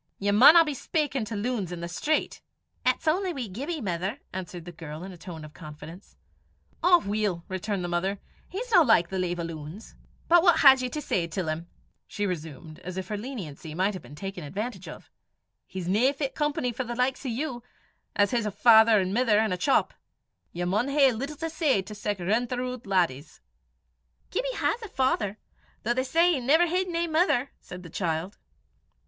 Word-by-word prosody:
"Ye 200 +1 0
maunna 300 +11 +8
be 300 - -2
speykin' 285 -3 -1
to 215 - -5
loons 205 -4 -2
i' - - -3
the 170 0 -5
street." 295 - -1 0.4
"It's - - 0
only 360 +3 +1
wee 260 -6 -4
Gibbie, 280 - -4
mither," 185 -1 -2 0.2
answered 180 -2 -6
the 175 - -7
girl 160 -1 -8
in 190 - -7
a - - -10
tone 165 -2 -9
of 150 - -13
confidence. 155 +3 -11 0.7
"Ow 355 0 +7
weel!" 200 -4 -2
returned 190 0 -3
the - - -2
mother, 180 +3 -1 0.3
"he's 465 +7 -5
no 375 - +7
like 225 - +4
the 190 - -3
lave 175 -1 -1
o' - - -2
loons." 165 +4 -8 0.3
"But 345 0 +6
what 345 -1 +4
had 270 -2 +8
ye 255 - -2
to 300 +4 -4
say 170 -8 0
till 165 0 -3
him?" 160 +2 -4 0.4
she 205 - -3
resumed, 160 -3 -6
as 185 +1 -7
if 190 - -3
afraid 210 +3 -4
her - - -6
leniency 165 - -7
might 190 +1 0
be - - -15
taken 195 +1 -6
advantage 190 - -5
of. 155 - -11 0.6
"He's 185 -2 -6
no 220 +9 +3
fit 275 -1 -3
company 295 -4 -1
for 245 +3 -3
the 240 -1 -5
likes 255 +3 0
o' 265 - -3
you, 245 0 -3 0.5
'at 205 -1 +3
his 235 -3 0
a - - -2
father 220 +1 +6
an' 185 0 -1
mither, 230 -2 +3
an' 215 -1 +2
a - - +1
chop 270 +9 +2
(shop). - - -32 0.5
Ye 175 - -4
maun 210 +8 +1
hae 275 -1 +4
little 275 +6 -4
to 325 +1 -3
say 300 - +1
to 210 +3 -9
sic 210 -1 -3
rintheroot 245 +5 -2
laddies." 170 -7 0 0.9
"Gibbie - - -2
has 480 - 0
a 440 - -7
father, 225 - 0 0.5
though 235 - +1
they 260 +1 0
say 335 +6 +3
he 285 - 0
never 300 +8 +4
hid 365 +2 0
nae 340 0 0
mither," 310 -5 +1
said 180 0 -10
the 170 - -10
child. 170 +2 -3
210 Hz, 200 wpm, -27 LUFS, 180-270 Hz, 0.9 s, maunna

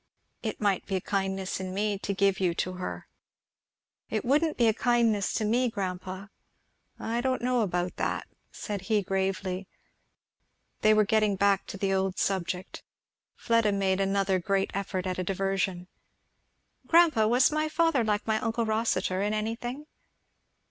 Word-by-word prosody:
"It 220 -2 -4
might 200 -3 0
be 195 - -1
a - - +1
kindness 190 0 -2
in 185 0 -5
me 205 0 0
to 200 - -3
give 195 0 +2
you 180 -3 +1
to 185 - -2
her." 185 0 -6 1.0
"It 220 +1 -2
wouldn't 300 +5 +2
be 235 - +4
a 220 - +4
kindness 230 -4 +2
to 220 - 0
me, 245 +3 +2
grandpa." 190 -1 -5 0.7
"I 230 +1 -2
don't 255 -1 -1
know 250 -1 +2
about 180 -3 -1
that," - - -1 0.3
said 205 -3 -5
he 210 -2 +3
gravely. 190 0 -2 1.1
They 215 0 +5
were 215 -1 +4
getting 215 -1 +2
back 200 0 +2
to - - -6
the 195 0 0
old 190 0 0
subject. 185 -1 -2 0.5
Fleda 230 -2 +2
made 195 -1 +1
another 195 -1 +1
great 195 +2 0
effort 195 -1 -3
at 185 0 -2
a - - 0
diversion. 190 -1 -1 1.0
"Grandpa, 325 -10 +5
was 245 +5 +4
my 310 0 0
father 320 -5 +2
like 210 -1 0
my 220 -1 +1
uncle 230 0 -1
Rossitur 220 -4 0
in 210 +1 0
any 215 +1 -1
thing?" 245 +5 -6
200 Hz, 160 wpm, -28 LUFS, 190-225 Hz, 1.1 s, They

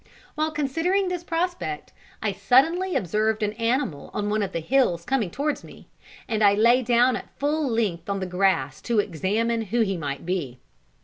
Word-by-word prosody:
While 310 +1 0
considering 325 +6 0
this 355 -1 -3
prospect, 335 - -3 0.3
I 210 - +1
suddenly 275 - +2
observed 215 +4 0
an 210 0 0
animal 230 - -1
on 205 0 -1
one 215 0 +1
of 200 - -2
the - - -2
hills 175 -3 +1
coming 245 -6 0
towards 290 - -2
me, - - -14 0.4
and 220 -1 0
I 200 -1 +6
lay 235 +4 +5
down 245 +1 +3
at - - -7
full 295 0 0
length 205 -7 -1
on 200 0 -1
the 190 - -2
grass 180 -7 0
to 235 -2 -1
examine 210 +5 0
who 230 +4 0
he 195 -4 0
might 140 -2 -5
be. 165 -9 -3
220 Hz, 180 wpm, -25 LUFS, 190-275 Hz, 0.4 s, I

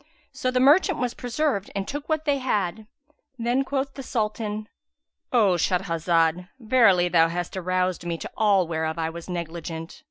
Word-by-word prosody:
So 255 - -2
the 255 0 +1
merchant 310 +7 +5
was 250 -1 -1
preserved 245 -4 -1
and 195 -1 -2
took 290 +2 -5
what 315 0 0
they 285 -2 +1
had. 210 -5 -1 0.5
Then 240 +3 +1
quoth 275 0 -2
the 275 - -7
Sultan, 215 -3 -3 0.6
"O 205 -7 +4
Shahrazad, 170 -1 +1
verily 220 -7 +4
thou 165 -2 +4
hast 175 +2 -4
aroused 185 -1 -1
me 170 -1 -3
to - - -7
all 200 -5 +3
whereof 160 0 -2
I 165 0 -1
was 170 +2 -9
negligent! 170 -1 -6
195 Hz, 160 wpm, -25 LUFS, 170-250 Hz, 0.6 s, merchant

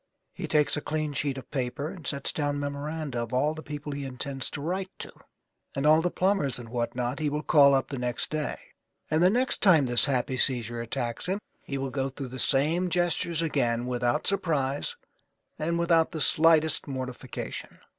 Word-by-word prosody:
He - - -5
takes 150 -1 +3
a 150 - -3
clean 155 -1 -2
sheet 140 -1 -1
of 130 - -10
paper 140 +3 -2
and 185 -5 -8
sets 140 -2 0
down 145 -1 -1
memoranda 145 -2 -3
of 120 +1 -4
all 145 +4 +2
the 155 - -8
people 150 -1 -6
he 140 0 -4
intends 135 0 -3
to - - -6
write 185 +6 -2
to, - - -7 0.6
and 135 - -1
all 155 +1 +6
the 175 - +1
plumbers 185 -9 +1
and 120 -2 -9
what 120 0 -2
not 125 0 -2
that - - -7
he 150 - +1
will 150 +1 -3
call 140 -2 +6
up 135 - 0
the 135 - -4
next 125 -1 -2
day. 155 -2 -2 0.5
And 155 +1 +3
the 180 - +6
next 250 +6 +1
time 165 -8 +6
this 120 -1 +4
happy 130 -2 0
seizure 120 -3 +2
attacks 120 +4 -2
him 190 +3 0 0.2
he 140 - -5
will 135 -1 -3
go 135 +1 -1
through 135 -1 -7
the 130 +1 -7
same 155 +9 +2
gestures 170 -1 0
again 120 -6 0
without 125 +3 0
surprise 145 -8 0 0.6
and 170 +2 0
without 170 -1 +3
the 160 - -3
slightest 160 -1 +4
mortification. 130 -2 -6
145 Hz, 195 wpm, -27 LUFS, 130-160 Hz, 0.6 s, all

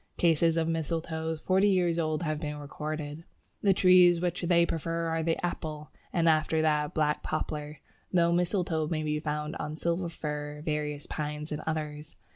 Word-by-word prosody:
Cases 165 -1 +3
of 165 -1 +1
Mistletoes 160 0 -2
forty 190 +2 +3
years 175 -3 +2
old 155 0 0
have 155 -2 -1
been 150 -1 -4
recorded. 150 +1 -5 0.4
The 200 - +4
trees 180 -2 +6
which 175 0 -1
they 170 -1 +4
prefer 165 +1 -2
are 165 0 0
the 165 0 +1
Apple, 155 -3 -5 0.2
and 170 -2 +2
after 155 0 +3
that 150 -1 +1
Black 150 -1 +1
Poplar, 150 -1 -4 0.3
though 170 -2 +3
mistletoe 170 -3 +1
may 155 -1 -1
be 150 0 -1
found 150 0 -3
on 150 - -4
Silver 170 +2 -1
Fir, 150 -2 -5
various 150 -1 -2
Pines, 150 0 -4
and 150 - -3
others. 150 -1 -4
160 Hz, 165 wpm, -29 LUFS, 150-170 Hz, 0.4 s, trees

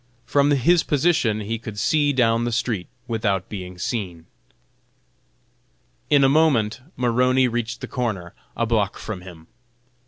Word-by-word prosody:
From 145 0 +2
his 150 +5 +4
position 140 -8 +1
he 110 +2 -3
could 110 -3 -8
see 145 +7 +2
down 115 -3 +2
the 120 - -1
street 115 -5 -1 0.2
without 105 -5 -1
being 90 -3 -7
seen. 90 -5 -4 1.8
In 145 -2 +5
a - - +6
moment 135 -6 +2
Maroney 125 +1 +2
reached 120 +1 -3
the 130 - -5
corner, 105 -10 -3 0.2
a 115 - +1
block 110 -3 0
from 105 -5 -6
him. 85 -3 -12
115 Hz, 135 wpm, -22 LUFS, 105-130 Hz, 1.8 s, a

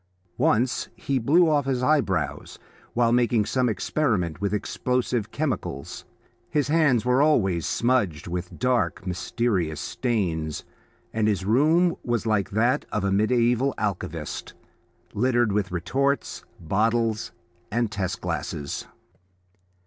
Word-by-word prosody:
Once 125 +3 +2
he 135 -1 -1
blew 165 +9 +4
off 145 -3 +2
his 130 -2 0
eyebrows 150 +1 0 0.4
while 120 -1 +3
making 120 -3 +3
some 125 +1 +1
experiment 100 - -1
with 100 - 0
explosive 120 +2 -1
chemicals; 130 - -4 0.4
his 145 -2 0
hands 145 -8 +3
were 125 +2 +3
always 95 - +2
smudged 115 -11 +1
with 90 0 -5
dark, 125 -6 0
mysterious 90 -3 -1
stains, 85 - -2 0.5
and 110 -1 +1
his 100 -3 0
room 160 - +3
was 120 -2 -1
like 105 -3 +1
that 120 +7 +1
of 105 - -1
a 100 - +1
mediaeval 120 +5 +2
alchemist, 100 -3 -4 0.6
littered 120 -1 +2
with 100 -2 -1
retorts, 135 +11 -1 0.2
bottles, 110 +1 0 0.4
and 115 -1 0
test 100 -2 -3
glasses. 75 -3 -4
115 Hz, 120 wpm, -25 LUFS, 95-130 Hz, 0.6 s, blew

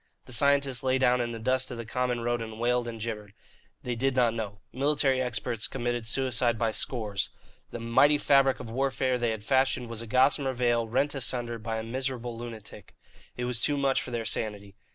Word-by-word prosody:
The - - -6
scientists 140 +1 +3
lay 130 0 +2
down 125 -1 +3
in 120 -1 -2
the 115 - -5
dust 130 +3 +1
of 125 - -6
the 115 - -5
common 125 +1 -1
road 120 0 -1
and 110 -1 -7
wailed 120 0 +1
and 115 -1 -6
gibbered. 105 -2 -5 0.5
They 125 - -2
did 130 +3 0
not 120 -3 +3
know. 105 -3 -5
Military 135 -1 +2
experts 120 -2 -2
committed 120 -3 -2
suicide 120 -1 +1
by 115 -1 +1
scores. 110 -4 -2 0.4
The 120 - -6
mighty 120 +6 +4
fabric 135 -2 +4
of - - -7
warfare 130 0 0
they 120 -1 +1
had 110 -2 -4
fashioned 130 -1 +1
was 115 -1 -4
a 115 - -8
gossamer 130 +3 +3
veil 120 -2 +1
rent 135 +6 +1
asunder 120 -3 -2
by 115 0 -3
a 110 - -3
miserable 125 0 -3
lunatic. 115 -2 -9 0.4
It 125 - -2
was 125 -1 0
too 145 +2 +2
much 135 -1 +2
for - - -7
their 120 -2 -3
sanity. 105 -3 -3
120 Hz, 200 wpm, -28 LUFS, 115-130 Hz, 0.5 s, mighty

